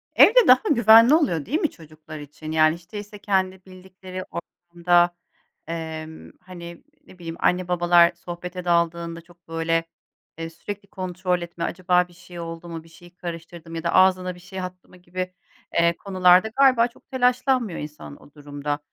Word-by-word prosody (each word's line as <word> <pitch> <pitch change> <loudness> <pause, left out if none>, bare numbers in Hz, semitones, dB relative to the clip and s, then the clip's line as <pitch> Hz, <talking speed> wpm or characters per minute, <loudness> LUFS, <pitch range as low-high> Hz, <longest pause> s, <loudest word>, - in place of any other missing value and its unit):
Evde 475 +1 +7
daha 255 +1 +7
güvenli 230 +1 +7
oluyor 175 - +1
değil 305 - -1
mi 320 - +1
çocuklar 155 -1 -12
için? 150 +2 -9
Yani, 155 0 +4
hiç 170 +1 -18
değilse 205 0 -8
kendi 190 -2 -1
bildikleri 185 0 -10
ortamda, 175 0 0 0.5
emm, 160 -1 -7
hani, 170 -2 -11 0.2
ne 185 - -16
bileyim, 165 -1 -6
anne 180 0 +1
babalar 175 -1 +4
sohbete 180 +1 -8
daldığında 170 -1 0
çok, 175 0 -23
böyle, 165 0 0 0.5
eee, 165 0 -5
sürekli 200 +5 -8
kontrol 185 -1 -3
etme, 170 0 -6
acaba 180 0 +1
bir 175 - -20
şey 175 0 -12
oldu 165 +1 -7
mu, 165 -1 -7
bir 165 - -19
şeyi 175 +2 -17
karıştırdı 170 -1 -8
mı 165 - -6
ya 165 - -5
da 170 - -1
ağzına 185 -1 +3
bir 180 - -15
şey 185 +1 -8
attı 180 0 -8
mı - - -17
gibi, 185 +1 -6 0.5
eee, 170 0 +3
konularda 185 0 +4
galiba 255 -4 +5
çok 240 - -23
telaşlanmıyor 250 -4 +1
insan 150 - -9
o 145 - -18
durumda. 145 0 -5
175 Hz, 170 wpm, -23 LUFS, 165-185 Hz, 0.5 s, Evde